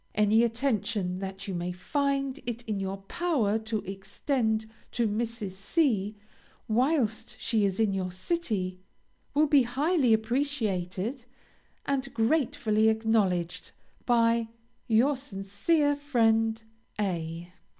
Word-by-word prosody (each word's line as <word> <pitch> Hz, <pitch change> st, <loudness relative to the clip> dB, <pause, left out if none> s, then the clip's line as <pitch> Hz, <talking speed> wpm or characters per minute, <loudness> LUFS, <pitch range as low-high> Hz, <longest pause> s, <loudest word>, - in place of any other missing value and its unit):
Any 215 Hz, +2 st, +4 dB
attention 220 Hz, -6 st, 0 dB
that 195 Hz, +1 st, -6 dB
you 195 Hz, -, -3 dB
may 175 Hz, 0 st, -2 dB
find 275 Hz, +7 st, -1 dB
it 240 Hz, 0 st, -3 dB
in 215 Hz, -3 st, -3 dB
your 195 Hz, 0 st, -4 dB
power 230 Hz, -, 0 dB
to 220 Hz, -1 st, -2 dB
extend 220 Hz, +4 st, -1 dB, 0.3 s
to 235 Hz, -2 st, +1 dB
Mrs. 220 Hz, -1 st, -2 dB
C. 210 Hz, -, 0 dB, 0.5 s
whilst 240 Hz, -1 st, +1 dB
she 220 Hz, -3 st, +1 dB
is 195 Hz, 0 st, -1 dB
in 215 Hz, -3 st, +2 dB
your 185 Hz, -1 st, -2 dB
city, 185 Hz, -, -2 dB, 0.6 s
will 300 Hz, +2 st, +5 dB
be 285 Hz, -2 st, +5 dB
highly 265 Hz, +2 st, +2 dB
appreciated, 225 Hz, -2 st, 0 dB, 0.6 s
and 275 Hz, -1 st, -1 dB
gratefully 225 Hz, -4 st, +2 dB
acknowledged, 200 Hz, -5 st, 0 dB, 0.3 s
by 230 Hz, -1 st, +3 dB, 0.4 s
Your 245 Hz, +6 st, +4 dB
sincere 260 Hz, +6 st, 0 dB
friend 225 Hz, -5 st, +2 dB, 0.4 s
A 170 Hz, -3 st, -3 dB
220 Hz, 110 wpm, -28 LUFS, 195-260 Hz, 0.6 s, will